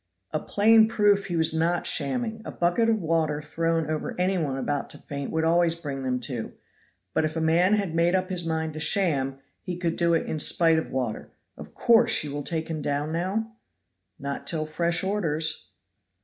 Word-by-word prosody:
"A 155 - -1
plain 220 +4 +4
proof 205 -3 +2
he 175 - -3
was 160 -1 +3
not 170 +2 0
shamming. 220 - 0
A - - -7
bucket 175 +7 +1
of 225 - +3
water 160 -3 0
thrown 165 +1 -1
over 155 +2 -4
any 185 +2 +1
one 145 -7 -2
about 145 +1 -2
to - - -10
faint 140 -1 -6
would 160 0 -1
always 165 0 +3
bring 145 -5 -6
them 130 -1 -1
to; 120 -2 -4 0.6
but - - +1
if 155 +1 -2
a - - -1
man 170 +5 +3
had 200 -6 -2
made 170 +2 +2
up 185 0 -1
his 180 -2 -2
mind 160 -1 -2
to 155 - -6
sham, 145 -7 +1 0.2
he 180 -2 -5
could 170 -2 -1
do 170 -1 +3
it 165 - 0
in 155 - -3
spite 165 +1 +3
of - - -6
water. 125 -4 -3 0.3
Of - - -12
course 230 -4 +4
you 150 - -5
will 145 +1 -4
take 160 +1 -3
him 160 -2 -4
down 145 +1 -2
now?" 195 +7 -2 0.7
"Not 140 0 -6
till 155 -2 -1
fresh 170 +3 0
orders." 160 - 0
165 Hz, 200 wpm, -25 LUFS, 150-185 Hz, 0.7 s, plain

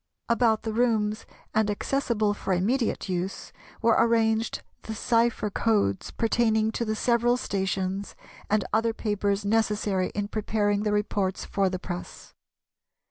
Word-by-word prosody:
About 230 -2 +2
the 220 - -3
rooms 220 -3 +1 0.3
and 220 -1 +2
accessible 215 -1 0
for 195 -2 -2
immediate 220 +8 0
use 185 +1 -4 0.3
were 230 0 +5
arranged 225 -1 +2 0.2
the 220 - -6
cypher 230 -2 +1
codes 205 - +1
pertaining 220 -1 +1
to 235 - -2
the 215 -1 -1
several 240 +2 +2
stations 195 -2 -2 0.3
and 210 -2 +2
other 225 +1 +2
papers 205 -2 -1
necessary 210 -3 +1
in 205 0 -1
preparing 205 -1 0
the 210 0 0
reports 205 -2 -1
for 195 -1 +1
the 185 - -3
press. 175 -1 -7
215 Hz, 135 wpm, -26 LUFS, 200-225 Hz, 0.3 s, were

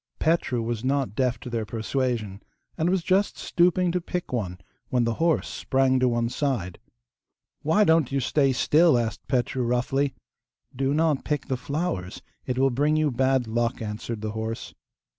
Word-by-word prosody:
Petru 155 -7 +1
was 115 0 -3
not 135 -5 0
deaf 125 +1 0
to - - -8
their 115 -2 -1
persuasion, 110 -2 -2 0.3
and 165 +1 0
was 185 -2 +1
just 195 +3 +1
stooping 180 0 +2
to 180 +1 -1
pick 180 -4 -4
one 95 -7 -2 0.3
when 125 -2 +2
the 115 0 0
horse 165 -1 +2
sprang 130 -1 +1
to 130 - +3
one 120 -1 0
side. 120 -9 -2 0.8
'Why 160 +8 +3
don't 160 -7 +3
you 135 - +1
stay 135 +1 +2
still?' 155 +3 +4
asked 115 -3 -3
Petru 130 0 0
roughly. 125 +3 0 0.6
'Do 135 +2 0
not 155 -3 +2
pick 150 -3 -2
the 130 - +1
flowers; 130 - -3 0.2
it 125 -1 -1
will 135 0 +3
bring 145 +5 +2
you 155 -2 +2
bad 130 0 +2
luck; 115 +2 -1
answered 110 +1 -5
the 110 0 -3
horse. 110 +1 -5
130 Hz, 170 wpm, -25 LUFS, 115-150 Hz, 0.8 s, still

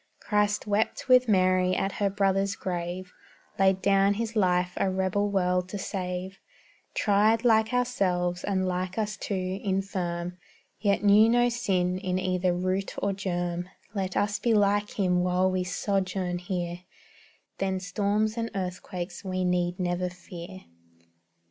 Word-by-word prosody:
Christ 210 -1 +1
wept 210 +4 0
with 255 -1 +6
Mary 185 -2 +3
at 195 - 0
her 200 - +3
brother's 195 0 +1
grave; 180 0 -4 0.5
Laid 190 -1 +3
down 200 0 +4
His 230 +1 -3
life 180 -3 +2
a 195 - +1
rebel 190 +2 0
world 180 -2 +1
to 205 - -4
save; 185 0 -4 0.6
Tried, 215 +3 +3
like 220 -1 +4
ourselves, 185 -8 0
and 190 -2 0
like 185 +1 -2
us 215 -1 -1
too, 190 -2 -3
infirm, 180 -3 -2 0.4
Yet 200 0 +1
knew 210 +2 +6
no 240 +1 +4
sin 185 -6 0
in 185 -1 -1
either 185 -1 +1
root 185 +2 -1
or 200 0 0
germ; 175 -2 -3 0.2
Let 190 -3 -2
us 205 0 +1
be 235 -2 +2
like 205 0 +2
Him 180 -3 +2
while 180 +1 +2
we 185 0 0
sojourn 185 -1 -1
here, 175 -2 -3 0.8
Then 190 -1 0
storms 205 +4 0
and 230 0 -2
earthquakes 180 -1 -5
we 185 -1 -2
need 180 0 0
never 180 0 -1
fear. 180 +1 -10
190 Hz, 140 wpm, -27 LUFS, 180-205 Hz, 0.8 s, with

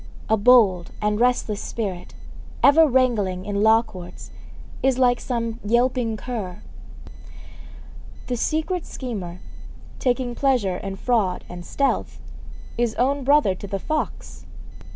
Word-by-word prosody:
A 220 - +5
bold 205 -6 +4
and 210 0 0
restless 240 -4 +1
spirit, 195 -6 -5 0.5
ever 315 +3 +7
wrangling 225 -9 +1
in 205 -1 -2
law 220 +1 +5
courts, 185 -6 -11 0.5
is 260 -1 +2
like 245 -2 +3
some 230 -2 -3
yelping 235 0 +1
cur. 210 -7 -6 1.6
The 250 - -2
secret 320 +7 -1
schemer, 190 -9 -6 0.6
taking 250 -2 0
pleasure 240 -9 +1
in 195 +1 -5
fraud 210 -4 0
and 175 0 -8
stealth, 275 +9 -1 0.6
is 235 -2 0
own 275 +3 +1
brother 280 -7 +4
to 195 +2 -9
the 195 0 -2
fox. 310 +10 -4
230 Hz, 120 wpm, -23 LUFS, 200-255 Hz, 1.6 s, ever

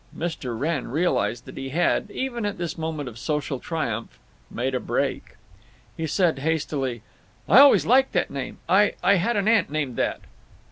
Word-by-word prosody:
Mr. 145 -8 -4
Wrenn 150 -1 -1
realized 120 - 0
that - - -11
he 135 0 -5
had, 175 +7 +1
even 240 0 -3
at 205 -1 -2
this 170 -2 -4
moment 160 -3 -4
of 115 -2 -9
social 150 -1 -2
triumph, 120 -10 -4 0.3
"made 130 +3 -2
a 125 - 0
break." - - -2 0.6
He 160 - -3
said, 165 -1 +1
hastily; 140 -6 -2 0.4
"I 215 - +7
always 280 0 +7
liked 265 +3 +4
that - - 0
name. 140 -2 -5
I—I 200 0 +3
had 210 +6 0
an 200 0 0
aunt 220 -5 +3
named 145 -5 -3
that!" - - -1
160 Hz, 170 wpm, -24 LUFS, 135-190 Hz, 0.6 s, I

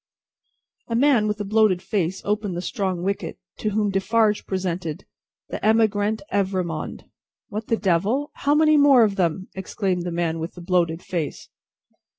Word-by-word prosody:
A 230 - -2
man 245 -4 +4
with 210 0 -2
a - - -3
bloated 215 -3 +3
face 190 -1 -2
opened 205 -3 -1
the - - -2
strong 185 -3 -2
wicket, 200 +1 -3 0.2
to 215 - 0
whom 210 -1 0
Defarge 210 +2 +1
presented 180 -4 -3 0.4
"The - - -6
Emigrant 215 -1 +2
Evrémonde." 185 -5 -2 0.5
"What 215 +1 -5
the 230 - +1
Devil! 210 - +1
How 285 +1 +1
many 310 0 +5
more 280 -4 +7
of 205 -3 +1
them!" 185 0 -1
exclaimed 190 -1 -2
the 175 0 -4
man 170 -1 -1
with 165 +1 -5
the 175 - -9
bloated 170 -2 0
face. 165 -5 -4
195 Hz, 160 wpm, -23 LUFS, 180-220 Hz, 0.5 s, more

